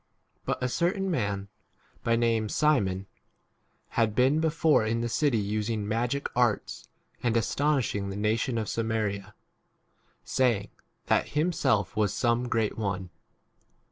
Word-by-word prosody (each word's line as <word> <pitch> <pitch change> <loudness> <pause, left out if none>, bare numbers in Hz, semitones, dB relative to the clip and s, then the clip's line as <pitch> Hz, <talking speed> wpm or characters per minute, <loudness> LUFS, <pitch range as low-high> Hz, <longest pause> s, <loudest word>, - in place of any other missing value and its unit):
9 - - +1
But - - -7
a - - +2
certain 180 +7 0
man, 100 - -1 0.6
by 115 - +2
name 115 -2 +1
Simon, 100 -12 +1 0.8
had 110 -3 +1
been 130 +5 +4
before 160 -4 +3
in 115 +1 0
the 120 - -1
city 135 +1 +1
using 105 +1 -1
magic 120 +6 -1
arts 120 -4 0 0.3
and 115 -1 +1
astonishing 120 -5 0
the 100 - -5
nation 110 +4 0
of 110 -2 -2
Samaria, 105 -3 -2 0.9
saying, 120 -6 +1 0.4
that - - +2
himself 135 - +1
was 105 -3 +1
some 120 0 +1
great 110 -2 0
one. 95 -4 -3
115 Hz, 130 wpm, -28 LUFS, 105-130 Hz, 0.9 s, been